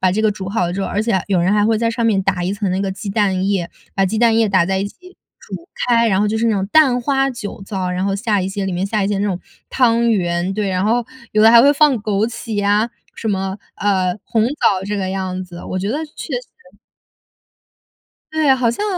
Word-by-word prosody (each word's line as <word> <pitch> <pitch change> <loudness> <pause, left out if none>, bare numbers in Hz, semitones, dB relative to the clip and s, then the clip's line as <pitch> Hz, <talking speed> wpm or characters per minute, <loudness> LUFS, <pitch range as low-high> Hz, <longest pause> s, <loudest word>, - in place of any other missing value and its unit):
把 185 - +3
这 215 +4 0
个 215 - +3
煮 195 -2 -6
好 195 -2 -1
了 175 - -2
之 195 - -3
后 - - -1
而 210 - -1
且 230 - -1
还 190 - +1
有 195 -3 +1
人 180 +4 +2
还 210 0 +3
会 225 -1 +2
在 230 +1 0
上 230 0 -1
面 195 -3 +2
打 185 -2 0
一 190 +3 -1
层 200 -2 -2
那 185 +1 -1
个 195 -1 -1
鸡 200 +1 -6
蛋 195 -2 +1
液， 190 -4 0 0.3
把 195 -1 +2
鸡 220 +4 -2
蛋 230 -1 +3
液 225 -2 +3
打 185 -3 +3
在 190 0 0
一 200 - -2
起 365 - -17 0.2
煮 340 - -9 0.2
开， 235 -1 +3
然 195 -1 +2
后 210 - +2
就 220 - -1
是 230 +1 +1
那 225 - +2
种 195 -1 -1
蛋 275 -6 +5
花 270 +2 +1
酒 205 -5 -7
糟， 190 -2 -3
然 180 +1 -2
后 195 0 0
下 210 -2 0
一 190 - -2
些 195 0 -3
里 190 - -2
面 180 +2 -1
下 210 0 -1
一 - - 0
些 205 -1 -1
那 205 - 0
种 185 -3 -2 0.3
汤 235 -2 +3
圆， 175 -2 0
对， 205 -1 -2
然 185 +1 0
后 230 +2 +1 0.3
有 215 - +2
的 225 - +8
还 235 0 +8
会 285 +1 +6
放 295 -1 +4
枸 210 0 0
杞 230 -1 -6
呀， 205 +3 +2 0.2
什 225 - -4
么 190 -1 -2 0.2
呃， 190 -2 0
红 220 -1 +1
枣 200 -9 +1
这 205 +1 -3
个 190 -1 -2
样 185 -1 -3
子， 175 -1 -11
我 185 - -3
觉 195 - -2
得 295 +8 -2
确 300 - -7
实 - - -5 1.8
对 315 -1 +1
啊， 265 - +7
好 245 -3 +1
像 410 - -3
205 Hz, 280 characters per minute, -18 LUFS, 190-230 Hz, 1.8 s, 的